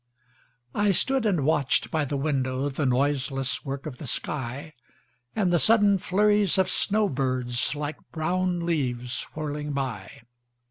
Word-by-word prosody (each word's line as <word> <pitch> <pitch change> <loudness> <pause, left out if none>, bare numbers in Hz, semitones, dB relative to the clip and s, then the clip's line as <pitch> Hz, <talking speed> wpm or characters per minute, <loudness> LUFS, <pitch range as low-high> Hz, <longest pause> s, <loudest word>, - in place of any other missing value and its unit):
I 205 0 +2
stood 265 +4 +2
and 175 -9 +1
watched 145 -3 +2
by 155 -2 +1
the 140 +1 -2
windowThe 135 0 0
noiseless 135 0 0
work 140 0 -5
of 135 -5 -7
the 145 - -7
sky, 140 +4 -4 0.6
And 185 -5 +2
the 175 - +4
sudden 205 -2 +4
flurries 205 +1 +3
of 190 - +2
snow 210 0 +2
birds, 130 -3 0
Like 145 0 -4
brown 175 +2 -1
leaves 125 -7 -1
whirling 150 -1 -3
by. 125 -9 -4
150 Hz, 135 wpm, -26 LUFS, 135-180 Hz, 0.6 s, the